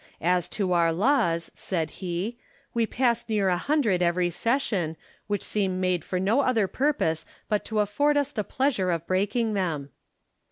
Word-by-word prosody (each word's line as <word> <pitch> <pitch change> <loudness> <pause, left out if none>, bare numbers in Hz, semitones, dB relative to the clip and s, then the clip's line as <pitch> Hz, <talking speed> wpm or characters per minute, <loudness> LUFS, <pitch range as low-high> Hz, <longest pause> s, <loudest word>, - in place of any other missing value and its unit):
" - - -31 0.2
As 175 - -7
to 190 -4 +1
our 170 -1 +3
laws," 170 - +1
said 160 -5 -2
he, 185 +5 -2 0.2
" - - -35
we 230 -1 +1
pass 240 -1 0
near 205 -3 +2
a 180 - +2
hundred 225 - +1
every 175 0 +2
session, 195 - 0 0.3
which 205 -1 -1
seem 190 -3 -1
made 185 -3 0
for 185 - -2
no 205 +8 +2
other 230 -7 +2
purpose 190 - 0 0.2
but 210 -2 0
to 215 -1 +1
afford 290 +9 +2
us 285 0 +1
the 210 - -2
pleasure 245 -6 0
of 170 -2 -1
breaking 205 +5 0
them." 160 -8 -2
195 Hz, 175 wpm, -26 LUFS, 175-235 Hz, 0.3 s, our